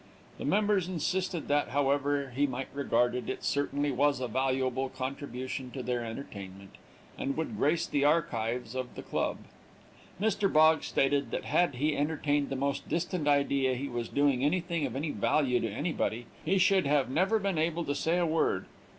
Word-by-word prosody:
The - - -4
members 205 -3 +2
insisted 180 0 -2
that, 145 0 +2
however 140 0 +1
he 145 +2 +2
might 130 0 -4
regard 120 -3 +1
it, 125 0 -4
it - - -4
certainly 145 0 0
was 140 +1 +2
a 125 - -2
valuable 130 0 0
contribution 130 0 -5
to 130 - -5
their 120 0 -1
entertainment, 100 -5 -8 0.4
and 140 - -2
would 160 - -2
grace 155 +4 +2
the 140 - 0
archives 125 -7 0
of 130 -1 -4
the - - -7
club. - - -1 0.8
Mr. 205 -1 +1
Boggs 155 +1 +5
stated 140 +1 +1
that - - -3
had 175 -6 +2
he 150 +4 +1
entertained 145 -1 0
the 135 - -2
most 140 +1 -2
distant 170 -2 -1
idea 140 -2 +2
he 135 +3 -3
was 120 -2 -4
doing 140 -3 +2
anything 170 0 0
of 125 - -7
any 150 +3 -2
value 130 -6 +2
to 115 - -2
anybody, 120 - -2 0.2
he 190 +5 +2
should 190 -3 +4
have 140 -2 +3
never 190 +9 +2
been 195 -5 -1
able 165 +1 0
to 145 - -1
say 165 +4 0
a 175 - +2
word. 160 - +1
140 Hz, 175 wpm, -30 LUFS, 130-160 Hz, 0.8 s, Boggs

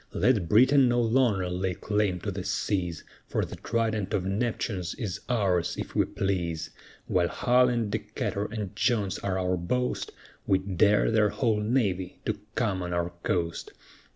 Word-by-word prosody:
Let 105 -10 +2
Britain 130 +4 +6
no 120 0 +2
longer 115 -5 +2
lay 90 0 -2
claim 105 -3 0
to 100 - -3
the 95 0 -5
seas, 90 -7 -1 0.2
For - - -1
the - - -9
trident 110 -4 -1
of 90 - -1
Neptune 105 0 -1
is 90 +3 -4
ours, 95 -8 +1
if - - -5
we - - +3
please, 85 -4 -2 0.3
While 90 -1 +2
Hull 125 +6 +3
and 115 -4 -1
Decatur 105 -1 -2
and 105 -2 -5
Jones 105 -4 +1
are 95 -1 -1
our 90 0 0
boast, 125 +9 -1 0.4
We 95 - +4
dare 100 +3 +2
their 110 -2 +4
whole 110 0 +1
navy 105 -6 0
to 105 -1 -1 0.2
come 100 -6 0
on 90 -1 -3
our 85 0 -1
coast. 85 -2 -2
100 Hz, 160 wpm, -27 LUFS, 90-115 Hz, 0.4 s, Britain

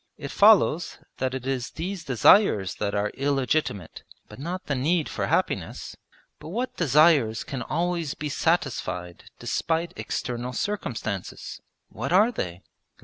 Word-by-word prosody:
It - - -7
follows - - +4 0.2
that 130 0 -1
it 130 -1 -6
is 130 -2 -2
these 180 +1 -5
desires 125 - +4
that 100 -1 -1
are 105 +1 0
illegitimate, 135 - -1 0.3
but - - -12
not 175 +6 -5
the 145 - -1
need 155 +5 +1
for - - -3
happiness. - - -1 0.4
But - - -9
what 240 +8 -3
desires 150 -7 +4
can 135 -3 -5
always 170 +3 -2
be 150 - -4
satisfied 115 - -1
despite 165 +1 -1
external 125 +1 -4
circumstances? 115 - -4 0.3
What 130 +7 -5
are 205 +6 +5
they? 90 - -5
140 Hz, 135 wpm, -25 LUFS, 115-170 Hz, 0.4 s, are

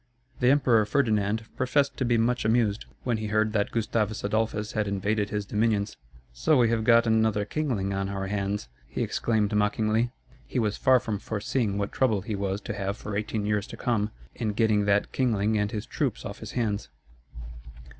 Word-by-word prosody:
The 125 - +4
Emperor 130 -6 +4
Ferdinand 110 -4 +1
professed 140 +2 +1
to 130 - 0
be 120 -1 +3
much 120 +2 +1
amused 110 -2 +1 0.2
when 120 -3 0
he 110 0 -3
heard 110 +1 +1
that 100 -2 +1
Gustavus 110 -1 -1
Adolphus 105 0 -1
had 105 -1 -1
invaded 100 +1 0
his 105 -1 -2
dominions. 105 -1 0 0.4
"So 135 - +3
we 120 -2 +4
have 115 -1 +1
got 115 +1 +5
another 110 -2 +2
kingling 110 -8 -1
on 95 0 -2
our 100 -1 -3
hands," 100 -4 -2 0.2
he - - -2
exclaimed 110 -3 0
mockingly. 110 +3 +1 0.4
He - - -4
was 105 -3 +1
far 130 -2 +4
from 110 -3 -3
foreseeing 110 0 -1
what 100 0 -2
trouble 110 -7 +1
he 105 +3 -4
was 100 0 -2
to 105 - -5
have 100 +1 -3
for 105 - -5
eighteen 105 0 -2
years 105 -1 0
to - - -9
come, 105 -4 0 0.2
in 110 -3 -2
getting 110 -2 +2
that 100 0 +2
kingling 110 -4 +1
and 105 0 0
his 105 -1 -4
troops - - -2
off - - -6
his - - -8
hands. 110 -4 -1
110 Hz, 185 wpm, -27 LUFS, 100-115 Hz, 0.4 s, got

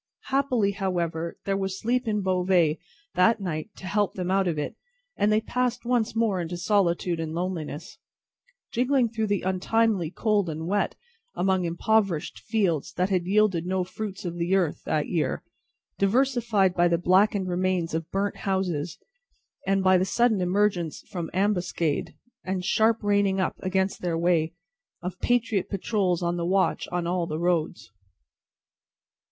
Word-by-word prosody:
Happily, 260 -7 +2
however, 170 -4 -2
there 195 - 0
was 195 -1 -2
sleep 245 +2 0
in 210 -2 0
Beauvais 180 -4 +2 0.3
that 225 +6 +4
night 170 -1 -4
to - - -11
help 205 +1 0
them 185 -1 -2
out 195 -1 +2
of 165 -3 -1
it 150 - -3 0.4
and 210 - +2
they 215 +1 +3
passed 245 +1 -1
on 245 - -2
once 230 -2 +1
more 220 -5 +1
into 175 +1 -4
solitude 175 -2 +1
and 160 0 -3
loneliness: 170 -3 -4 0.7
jingling 250 0 +2
through 220 -1 -2
the 205 -1 0
untimely 190 0 +1
cold 205 -1 +1
and 160 +1 -4
wet, 200 +4 0 0.4
among 190 -1 +1
impoverished 175 -2 0
fields 195 -9 0
that 180 +2 0
had 180 -2 +1
yielded 195 -4 +2
no 185 0 0
fruits 195 +1 -6
of 175 0 -4
the 175 +3 +1
earth 180 -6 0
that 150 -1 0
year, 165 -4 -1 0.6
diversified 225 -3 +2
by 175 -1 +3
the 170 0 +2
blackened 190 +2 +3
remains 180 -2 0
of 165 0 -3
burnt 200 +1 -1
houses, 180 -5 -2 0.7
and 195 0 +2
by 185 -1 +5
the - - +2
sudden 225 0 +2
emergence 180 -3 0
from 170 -3 -4
ambuscade, 180 -5 0 0.3
and 185 -1 -3
sharp 225 +2 +2
reining 200 -1 +2
up 185 - 0
across 190 +1 0
their 170 -2 -1
way, 170 -1 +1 0.5
of 180 +1 -5
patriot 230 -5 +1
patrols 190 -3 0
on 175 0 0
the 170 - -2
watch 190 +1 +1
on 175 -1 -1
all 175 0 0
the 155 - -3
roads. 170 - -1
190 Hz, 160 wpm, -26 LUFS, 175-210 Hz, 0.7 s, by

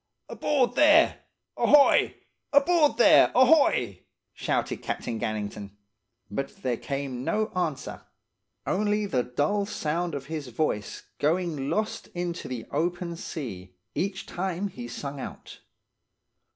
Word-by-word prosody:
"'Aboard 260 -5 +1
there! 305 +4 +5 0.4
Ahoy! 290 -1 +5 0.4
Aboard 295 -1 +4
there! 240 - +6
Ahoy!' 250 - +4 0.3
shouted - - -1
Captain 115 - -4
Gannington; 105 -2 -4 0.6
but 135 +7 -5
there 125 -3 0
came 135 -2 -4
no 215 +9 0
answer, 160 -7 -3 0.6
only 210 +1 +1
the 135 -11 0
dull 150 +12 -1
sound 170 -2 -2
his 150 -1 -5
voice 120 -5 -2 0.2
going 155 -3 0
lost 215 0 -2
into 175 0 -3
the 125 -3 -5
open 170 +3 -2
sea, 100 - -7 0.2
each 195 +1 -2
time 190 +2 -3
he 125 -9 -8
sung 140 +4 -6
out. - - -9
165 Hz, 110 wpm, -27 LUFS, 125-210 Hz, 0.6 s, there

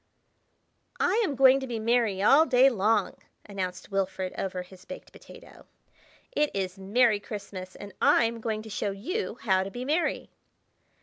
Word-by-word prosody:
"I 420 +6 +2
AM 300 -9 -1
going 265 +1 +6
to 265 - -6
be 235 -2 -4
merry 220 -3 +1
all 305 +9 +6
day 260 +1 +5
long!" 210 -2 +1 0.3
announced 190 -2 -5
Wilfrid 190 -1 -2
over 185 -1 -4
his 185 0 -16
baked - - -10
potato. - - -15 0.6
"It 300 -11 +1
is 190 -1 -3
Merry 210 +2 +2
Christmas 200 -2 -8
and 205 -2 -10
I'm 230 0 +3
going 220 -1 -3
to 220 - -10
show 205 - -2
you 245 - -4
how 190 -4 +2
to 190 - -4
be 245 +5 -6
merry." 310 +5 -1
215 Hz, 160 wpm, -27 LUFS, 195-255 Hz, 0.6 s, going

